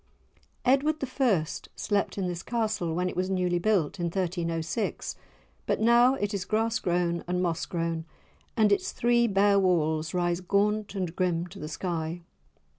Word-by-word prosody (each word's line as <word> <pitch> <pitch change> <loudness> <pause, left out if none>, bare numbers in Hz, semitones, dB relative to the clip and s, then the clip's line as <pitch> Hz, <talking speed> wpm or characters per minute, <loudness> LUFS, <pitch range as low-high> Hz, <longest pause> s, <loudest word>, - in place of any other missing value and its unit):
Edward 275 +4 +3 0.3
I. 200 -12 +3 0.3
slept 205 -1 -1
in 195 - -1
this 175 -1 -3
Castle 215 -8 -1
when 180 +1 0
it - - -4
was 185 +1 -1
newly 180 -2 +1
built, 190 -4 +1
in 175 - 0
1306; 170 +1 -2 0.5
but - - +1
now 240 +3 +5
it 205 -3 -2
is 195 -2 -2
grass 220 +2 0
grown 175 -2 0
and 180 0 0
moss 170 -3 -1
grown, 165 -1 -2 0.5
and 215 -2 +4
its 200 - +1
three 235 0 +3
bare 200 -1 +4
walls 160 -3 +1
rise 175 -1 +1
gaunt 205 +3 0
and 180 -3 -3
grim 175 -2 0
to - - -11
the 150 - -5
sky. 165 0 -3
185 Hz, 160 wpm, -28 LUFS, 170-210 Hz, 0.5 s, now